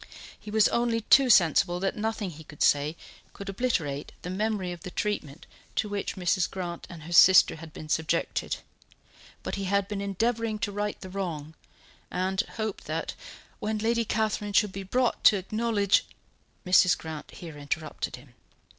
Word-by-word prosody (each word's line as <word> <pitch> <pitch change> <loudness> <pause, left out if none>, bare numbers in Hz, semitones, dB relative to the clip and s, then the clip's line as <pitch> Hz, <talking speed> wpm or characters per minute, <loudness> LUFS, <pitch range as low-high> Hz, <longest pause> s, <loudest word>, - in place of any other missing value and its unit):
He - - -10
was 215 0 +4
only 235 -1 +1
too 260 +4 +5
sensible 175 -2 +4
that 195 +1 -1
nothing 215 -3 -2
he 160 0 -11
could 150 -1 -4
say 145 +3 +3 0.4
could 200 0 -8
obliterate 170 - -2
the 180 - -4
memory 200 -2 -1
of 175 - -8
the 185 - -6
treatment 170 -7 -3 0.3
to 215 - 0
which 205 -1 -3
Mrs. 185 0 +1
Grant 175 -3 -5
and 165 -3 -10
her 170 - -9
sister 185 -1 +7
had 160 0 -10
been 155 - -9
subjected, 160 +2 -1 0.9
but - - -4
he 195 - -3
had 200 +1 +1
been 205 -1 -4
endeavouring 220 +3 -1
to 210 -1 -2
right 205 +1 -3
the 185 - -8
wrong, 165 -6 -4 0.6
and 190 +2 0
hoped 220 -3 -4
that - - -3 0.5
"when 215 +1 -2
Lady 230 +2 +1
Catherine 215 -1 -1
should 210 0 +3
be 195 - -6
brought 245 +6 0
to 205 - +8
acknowledge 205 +1 +1 0.3
" - - -39
Mrs. 180 0 +5
Grant 160 -2 -7
here 165 -3 -10
interrupted 145 +2 -4
him. 125 0 -17
195 Hz, 170 wpm, -27 LUFS, 170-215 Hz, 0.9 s, to